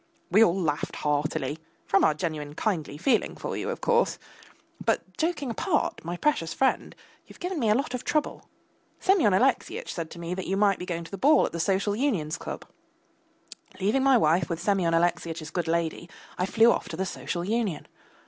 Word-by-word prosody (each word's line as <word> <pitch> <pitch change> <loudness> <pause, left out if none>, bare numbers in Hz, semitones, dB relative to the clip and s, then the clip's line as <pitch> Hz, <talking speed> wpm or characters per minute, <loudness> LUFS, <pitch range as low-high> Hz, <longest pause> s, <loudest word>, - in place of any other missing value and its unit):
We 210 +5 +7
all 180 -1 +2
laughed 150 -5 -1
heartily 150 +1 -1 0.3
from 195 - +3
our 150 - +4
genuine 150 -3 -4
kindly 160 -9 -2
feeling 225 - +1
for - - -5
you, - - -3
of - - -4
course 480 0 +2 0.7
but, - - -1
joking 315 -6 -1
apart, - - -1
my 175 +2 -4
precious 170 - 0
friend, 265 - +1 0.3
you - - -13
have - - -19
given 360 -1 -3
me 225 -5 +1
a 210 - +5
lot 265 0 -1
of 250 0 -3
trouble. 305 -1 -2 0.5
Semyon 370 - +4
Alexeyitch 255 +7 +1
said 165 -2 -4
to - - -11
me 170 +1 -4
that 190 0 -5
you 195 - 0
might 200 -1 +3
be 180 - -6
going 170 -1 -3
to 165 - -12
the 195 - -6
ball 300 +7 +5
at - - -4
the 170 - -5
Social 195 +3 +1
Union's 210 - -1
club! - - -6 1.1
Leaving 210 +8 +2
my 270 -1 +5
wife 165 -2 +2
with 165 - -2
Semyon 185 -5 +1
Alexeyitch's 165 -2 -1
good 175 0 -2
lady, 170 +1 -1 0.3
I 180 - -1
flew 225 +3 +5
off - - -2
to 160 - -6
the 190 - -1
Social 175 -1 -4
Union. 210 -7 -1
185 Hz, 195 wpm, -27 LUFS, 165-235 Hz, 1.1 s, We